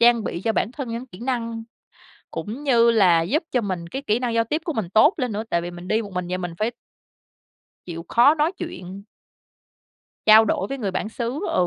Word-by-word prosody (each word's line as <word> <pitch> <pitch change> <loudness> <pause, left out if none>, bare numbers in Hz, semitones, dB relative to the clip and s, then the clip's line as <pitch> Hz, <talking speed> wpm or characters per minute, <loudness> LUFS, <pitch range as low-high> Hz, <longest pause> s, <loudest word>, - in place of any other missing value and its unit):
trang 235 -2 +5
bị 170 - -3
cho 225 - +2
bản 220 - -1
thân 270 -3 -5
những 235 +3 -5
kỹ 190 -3 -14
năng 230 -3 -3 0.7
cũng 235 +8 -5
như 235 -4 +5
là 180 -7 +5
giúp 290 - 0
cho 250 - +2
mình 185 -5 -4
cái 265 +11 -5
kỹ 225 -4 0
năng 245 -2 -1
giao 230 0 +3
tiếp 300 +8 -2
của 325 - -2
mình 210 -8 -3
tốt 255 - +5
lên 250 -3 -1
nữa 210 +1 -3
tại 170 - +1
vì 175 +1 -5
mình 175 +1 -10
đi 215 +4 +1
một 200 -3 -9
mình 180 -1 -3
vậy 180 - -2
mình 175 -2 -5
phải 220 +3 0 1.2
chịu 165 -2 -6
khó 260 +6 +5
nói 315 +3 +1
chuyện 200 - -8 1.2
trao 220 +1 +8
đổi 195 -2 0
với 275 - -4
người 205 -5 -2
bản 210 - -3
xứ, 235 +5 -4
ừ. 180 - +2
225 Hz, 225 wpm, -23 LUFS, 185-250 Hz, 1.2 s, trao